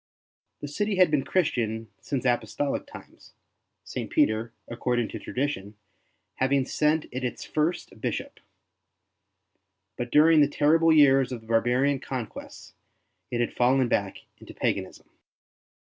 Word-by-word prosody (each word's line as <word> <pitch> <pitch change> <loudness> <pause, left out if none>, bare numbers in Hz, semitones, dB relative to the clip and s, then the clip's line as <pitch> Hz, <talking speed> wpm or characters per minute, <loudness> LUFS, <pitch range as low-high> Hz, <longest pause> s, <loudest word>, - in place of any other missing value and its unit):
The 145 - -5
city 205 +8 -1
had 185 -4 +4
been 145 -3 +2
Christian 115 -10 -1
since 135 -2 -4
Apostolic 130 +3 -1
times, - - -14 0.5
St. - - -5
Peter, 110 +2 +1 0.2
according 120 0 -1
to - - -6
tradition, 125 -7 -3 0.6
having 135 0 +2
sent 150 +2 +1
it 130 +1 -5
its 125 - -4
first 155 +3 -2
Bishop; - - -4 1.6
but 120 0 -4
during 155 +1 +6
the 145 - +5
terrible 160 +3 +3
years 135 -4 +5
of 120 -3 -5
the - - -19
barbarian 125 +5 +2
conquests 125 -5 -7 0.6
it 120 - -1
had 120 - -1
fallen 130 +1 +3
back 100 -3 -1 0.2
into - - -13
paganism. - - -3
135 Hz, 130 wpm, -26 LUFS, 120-150 Hz, 1.6 s, during